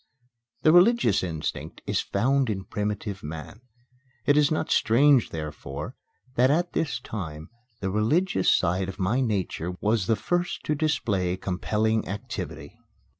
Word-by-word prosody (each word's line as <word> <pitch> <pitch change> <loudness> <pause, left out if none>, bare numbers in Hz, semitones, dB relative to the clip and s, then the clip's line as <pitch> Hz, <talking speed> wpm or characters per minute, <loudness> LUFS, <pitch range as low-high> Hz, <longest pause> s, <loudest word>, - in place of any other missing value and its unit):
The 155 - +6
religious 175 - +5
instinct 80 -4 -4
is - - 0
found 135 0 +1
in 95 -3 -2
primitive 105 -1 -3
man. 80 +8 -8 0.6
It 145 - +4
is 150 -1 +4
not 155 0 -1
strange, 130 +2 +4
therefore, 75 - -6 0.4
that 130 +1 +4
at 175 +4 +1
this 150 -3 -1
time 80 -9 -7 0.3
the 95 -1 -1
religious 110 - +2
side 90 +2 +1
of 95 - -7
my 100 +6 +1
nature 95 -6 -1
was 105 -3 +1
the 115 - +3
first 175 - -2
to 150 - 0
display 100 - 0
compelling 110 +4 0
activity. 100 +2 -6
105 Hz, 135 wpm, -26 LUFS, 95-140 Hz, 0.6 s, The